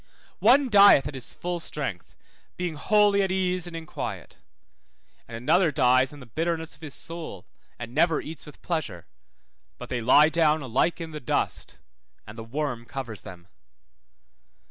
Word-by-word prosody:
One 260 +6 +5
dieth 200 - +7
at 145 - -7
his 130 -2 -5
full 175 0 -4
strength, 135 - -5 0.4
being 175 -2 -2
wholly 205 +6 +3
at 195 - 0
ease 185 -2 0
and 170 - -7
in 165 -1 -6
quiet; - - -7 0.9
and 115 - -7
another 165 +7 +2
dies 130 0 +3
in 145 - -12
the 130 - -11
bitterness 160 +6 -3
of - - -17
his 150 -3 -8
soul, 165 - -7 0.3
and 115 0 -8
never 165 +2 +3
eats 155 -1 -9
with 150 - -14
pleasure; 130 - -3 0.7
but - - -9
they 120 - -2
lie 150 +6 +6
down 160 -2 +2
alike 135 +8 0
in 165 -1 -6
the 155 - -6
dust, 125 - -2 0.5
and 105 - -11
the 115 - -7
worm 125 0 -3
covers 120 -5 -6
them. 90 -1 -12
155 Hz, 165 wpm, -26 LUFS, 125-170 Hz, 0.9 s, dieth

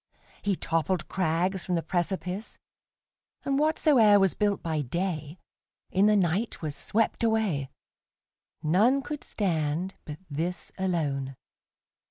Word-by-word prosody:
He 200 -1 +1
toppled 165 +2 -1
crags 185 +1 0
from 180 - -1
the 165 - -1
precipice, 185 +3 -3 0.9
And 275 0 +1
whatsoe'er 285 -9 +5
was 195 -2 +3
built 205 -2 0
by 160 -3 -1
dayIn 155 +2 -3 0.6
the 205 +3 +5
night 195 +4 +1
was 150 -3 -4
swept 225 +7 0
away:None 210 - -1
could 295 0 -5
stand 170 -1 -1
but 150 -2 -6
this 170 +4 -3
alone. 145 -8 -1
185 Hz, 110 wpm, -28 LUFS, 160-205 Hz, 0.9 s, whatsoe'er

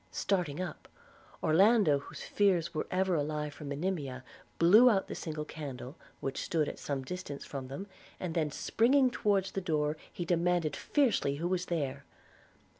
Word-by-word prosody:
Starting 180 -6 -1
up, 185 -3 -5 0.6
Orlando, 190 -2 +5
whose - - -9
fears 180 -5 +2
were 155 - -2
ever 185 0 +1
alive 150 -1 -1
for 150 - -10
Monimia, 140 -3 -3 0.3
blew 210 +9 +7
out 195 -4 +2
the - - -5
single 155 -2 -4
candle 140 -3 -7 0.3
which 135 - -3
stood 155 -3 0
at - - -6
some 140 -2 -3
distance 145 -2 -6
from 135 -2 -6
them; 140 +9 -6 0.3
and 180 -3 -3
then 155 -2 +1
springing 250 - +3
towards 200 -4 +1
the 195 - -3
door 155 -3 0
he 175 - -4
demanded 170 -3 +1
fiercely 240 - +1
who 165 +4 -2
was 180 0 -1
there. 140 -5 -2
165 Hz, 160 wpm, -31 LUFS, 145-190 Hz, 0.6 s, blew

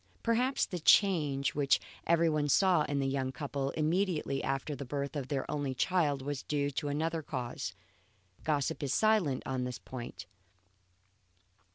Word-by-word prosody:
Perhaps 245 +4 +2
the 180 - -5
change 150 -7 +4
which 140 -2 +3 0.3
everyone 160 -3 +3
saw 180 +2 +4
in 145 - -2
the 135 -1 +1
young 135 -1 -1
couple 140 -1 -3
immediately 160 -3 0
after 135 +2 -2
the 140 - -6
birth 140 +2 -4
of 140 -3 -3
their 135 -2 -2
only 140 -3 -2
child 145 -3 +1
was 140 -1 -3
due 145 -1 -1
to 145 +2 -3
another 160 +3 -1
cause. 120 - -4 0.7
Gossip 150 0 0
is 140 -3 0
silent 210 -12 +2
on 130 -1 -2
this 125 -1 -4
point. 120 -6 -8
145 Hz, 150 wpm, -32 LUFS, 135-160 Hz, 0.7 s, change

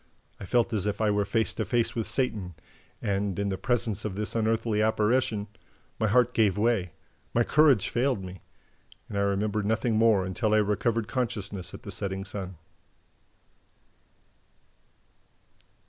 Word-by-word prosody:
I - - -7
felt 120 +4 +1
as 105 -2 0
if 105 0 -2
I 110 -1 +2
were 100 0 +1
face 110 +3 +1
to 110 - -2
face 115 +3 0
with 115 -2 -2
Satan; 105 - -1 0.5
and, 100 -2 -1
in 100 0 -1
the 95 - -1
presence 115 -4 -1
of 105 -3 -3
this 105 +1 -3
unearthly 110 -1 +1
apparition, 110 0 +1 0.5
my 110 - +2
heart 125 +3 +3
gave 105 -4 +2
way, 105 -6 +1 0.4
my 120 - +4
courage 140 -6 +4
failed 125 -4 0
me... 90 -1 -9 0.7
and - - -6
I 100 - +1
remember 100 +2 0
nothing 110 +2 0
more 110 -4 +4
until 105 +4 0
I - - +5
recovered 105 +1 +1
consciousness 105 -7 -3
at - - -12
the - - -7
Setting 95 0 -3
Sun." 95 -2 -6
105 Hz, 150 wpm, -27 LUFS, 100-115 Hz, 0.7 s, I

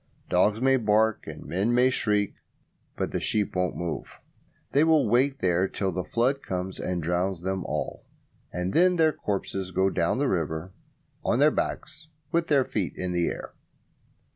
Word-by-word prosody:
Dogs 105 +4 +3
may 135 +1 +4
bark 110 -1 +2
and - - -8
men 100 +7 0
may 125 +1 +4
shriek, 105 -4 +1 0.6
but - - -2
the - - -1
sheep 105 -3 0
won't 90 0 0
move. 85 -2 -3 0.6
They 145 - +4
will 160 -5 +4
wait 130 +5 +2
there 90 +1 +2
till 95 0 -2
the 90 +1 -3
flood 125 +8 0
comes 95 0 -4
and 90 -2 -2
drowns 90 +2 -1
them 95 0 -2
all, - - -3 0.5
and 90 +1 -2
then 180 +2 +5
their 160 -2 +3
corpses 95 -3 -3
go 95 +1 +1
down 85 - +1
the 140 +1 +1
river 80 - -2 0.5
on 115 - +1
their 150 +3 +5
backs 155 +1 -4 0.2
with 170 0 +1
their 140 -4 +3
feet 95 -6 -2
in 90 -1 -3
the 85 -1 +1
air. - - -5
100 Hz, 170 wpm, -27 LUFS, 90-130 Hz, 0.6 s, then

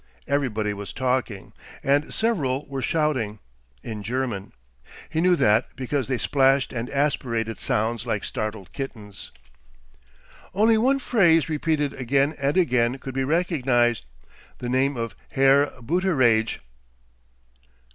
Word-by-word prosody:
Everybody 110 -7 0
was 100 -1 -7
talking, 125 -6 -2 0.3
and 145 +2 +1
several 150 - 0
were 135 -1 -5
shouting, 135 -9 0 0.5
in 110 -2 -6
German; 115 -2 -3 0.6
he 160 0 -1
knew 180 0 +4
that 110 -5 +3
because 135 0 -2
they 130 -1 0
splashed 135 +2 +2
and 120 0 -4
aspirated 125 -6 -1
sounds 115 +2 -1
like 105 -3 -1
startled 105 -3 -5
kittens. 105 -7 -7 1.2
Only 220 +2 +4
one 265 +4 +3
phrase, 175 - +3
repeated 150 -2 0
again 135 +4 +1
and 140 +5 +1
again 125 -7 +2
could 135 -1 -8
he 135 - 0
recognize 130 - +1 0.6
the 120 - -5
name 130 +2 +1
of 115 -1 -3 0.2
"Herr 135 +1 +5
Booteraidge." 130 -6 +1
130 Hz, 120 wpm, -24 LUFS, 115-150 Hz, 1.2 s, Herr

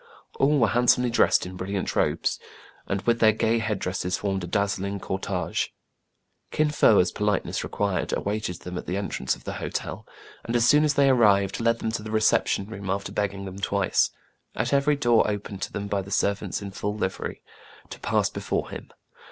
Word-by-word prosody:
All 145 +2 +4
were 115 -4 +4
handsomely 125 +1 +3
dressed 115 - +3
in 90 +1 -7
brilliant 95 +1 -3
robes, - - +1 0.5
and 100 0 -2
with 115 0 +2
their 110 -1 +6
gay 110 +1 +1
head 110 -2 -1
dresses 90 -1 -2
formed 95 -2 -2
a - - -4
dazzling 100 +1 -1
cor 95 0 -3
tege. 95 -2 -2 0.8
Kin 155 -1 +1
Fo, 110 -7 +5
as 90 -1 +3
politeness 105 -1 -1
required, 100 -2 -1
awaited 100 -4 -3
them 90 0 -5
at - - -10
the 90 - -1
entrance 100 -10 -2
of - - -17
the - - -5
hotel, - - -4 0.4
açd, 120 - 0
as 120 0 +4
soon 150 +3 +6
as 150 -1 +2
they 140 -1 +4
arrived, 100 -6 +3
led 115 0 +2
them 110 - -2
to 110 - -3
the 110 - -7
reception 110 -2 +2
room, 100 -2 -7
after 100 +1 -2
beg 105 -1 0
ging 100 0 -8
them 95 0 -7
twice, 100 -1 +1 0.5
at - - -1
every 140 +1 +3
door 120 -6 +3
opened 100 -1 -5
to - - -3
them 100 - -4
by 100 -1 -1
the 95 - -10
servants 100 +1 -1
in 100 - -6
full 105 +2 -3
livery, 95 -3 -4 0.5
to - - -8
pass - - +1
before - - -3
him. - - -8
100 Hz, 200 wpm, -25 LUFS, 95-115 Hz, 0.8 s, their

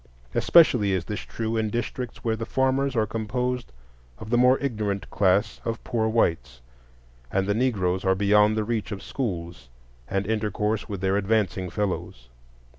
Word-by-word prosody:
Especially 125 - +5
is 90 -3 -1
this 105 - -4
true 115 0 -3
in 110 -1 0
districts 120 +2 -4
where 115 -1 +1
the 115 - -5
farmers 135 0 +1
are 110 -2 +2
composed 125 - -3 0.5
of 110 - -9
the 120 - +4
more 125 +1 +5
ignorant 105 -7 -2
class 100 +2 +2
of 115 0 -4
poor 115 -3 0
whites, 80 - 0 0.7
and 95 0 +1
the 100 - +1
Negroes 100 -6 0
are 95 0 +3
beyond 105 +2 +4
the 110 - +1
reach 110 0 -2
of 100 - -5
schools 85 - -5 0.4
and 100 +1 -1
intercourse 105 0 -1
with 100 -3 -5
their 95 +1 +1
advancing 100 -3 0
fellows. 90 - -4
105 Hz, 160 wpm, -25 LUFS, 95-115 Hz, 0.7 s, Especially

